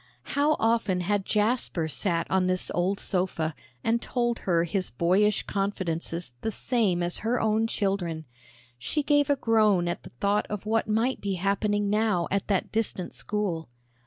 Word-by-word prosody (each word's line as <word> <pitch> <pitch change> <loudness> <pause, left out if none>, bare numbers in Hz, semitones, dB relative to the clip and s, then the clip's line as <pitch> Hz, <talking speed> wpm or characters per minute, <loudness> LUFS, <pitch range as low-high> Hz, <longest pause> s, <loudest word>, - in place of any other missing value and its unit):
How 295 +2 +3
often 225 -5 +2
had 195 +2 0
Jasper 210 -6 +1
sat 170 +1 0
on 190 -1 +3
this 185 0 -1
old 185 +3 0
sofa 180 -4 -1 0.3
and 230 +1 +1
told 240 -2 -1
her 170 -3 +2
his 185 +2 -1
boyish 185 - +2
confidences 175 - -2
the 225 - -1
same 210 -6 0
as 175 0 -1
her 235 +3 0
own 220 0 +2
children! 185 -7 -2 0.5
She 300 - -1
gave 290 -1 +3
a 285 - +4
groan 215 -8 +3
at 175 - -2
the - - -11
thought 200 +12 0
of 210 -1 -4
what 225 0 +1
might 225 +5 +1
be 195 -1 -1
happening 200 +2 0
now 210 -4 +1
at 200 0 0
that 195 -3 0
distant 215 -5 -2
school. 195 -8 -2
200 Hz, 160 wpm, -27 LUFS, 175-220 Hz, 0.5 s, a